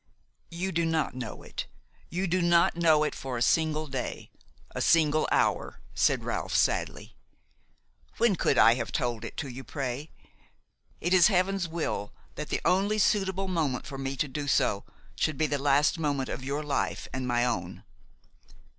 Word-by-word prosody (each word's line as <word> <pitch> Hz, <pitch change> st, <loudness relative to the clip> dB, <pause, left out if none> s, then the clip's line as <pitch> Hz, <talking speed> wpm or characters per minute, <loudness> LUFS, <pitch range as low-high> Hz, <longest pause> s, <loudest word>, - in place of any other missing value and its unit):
"You 180 Hz, +3 st, -3 dB
do 170 Hz, -1 st, 0 dB
not 160 Hz, -2 st, 0 dB
know 125 Hz, -1 st, -7 dB
it; -, -, -6 dB, 0.4 s
you 185 Hz, +3 st, -2 dB
do 185 Hz, 0 st, +1 dB
not 170 Hz, +1 st, +4 dB
know 160 Hz, -3 st, +4 dB
it 150 Hz, -, -1 dB
for 130 Hz, -2 st, -5 dB
a -, -, -4 dB
single 155 Hz, +1 st, +2 dB
day, 135 Hz, -3 st, -5 dB, 0.4 s
a -, -, -4 dB
single 155 Hz, -2 st, +3 dB
hour," -, -, +1 dB
said -, -, +2 dB
Ralph -, -, -3 dB
sadly. -, -, 0 dB, 1.0 s
"When 230 Hz, -4 st, +3 dB
could 140 Hz, -, +1 dB
I 115 Hz, -, +7 dB
have 125 Hz, -, -4 dB
told 120 Hz, -5 st, -2 dB
it -, -, -8 dB
to 150 Hz, -, -3 dB
you, 130 Hz, +1 st, -8 dB
pray? 135 Hz, +3 st, -4 dB, 0.9 s
It 175 Hz, +2 st, 0 dB
is 180 Hz, -2 st, +7 dB
Heaven's 190 Hz, -1 st, +1 dB
will 160 Hz, -11 st, -3 dB, 0.2 s
that -, -, -6 dB
the -, -, -1 dB
only 200 Hz, +4 st, +2 dB
suitable 195 Hz, -2 st, +1 dB
moment 155 Hz, -9 st, -1 dB
for 135 Hz, -2 st, -7 dB
me 135 Hz, 0 st, -3 dB
to 145 Hz, -, -1 dB
do 145 Hz, +2 st, -5 dB
so, 100 Hz, -7 st, +1 dB, 0.3 s
should 155 Hz, -3 st, -1 dB
be 155 Hz, -, +2 dB
the 145 Hz, -2 st, -1 dB
last 145 Hz, +3 st, +3 dB
moment 140 Hz, -4 st, -1 dB
of 130 Hz, -, -5 dB
your 140 Hz, +3 st, -2 dB
life 145 Hz, -2 st, -2 dB
and 130 Hz, -1 st, -3 dB
my 120 Hz, 0 st, +2 dB
own. 95 Hz, -8 st, -3 dB
150 Hz, 170 wpm, -28 LUFS, 135-170 Hz, 1.0 s, I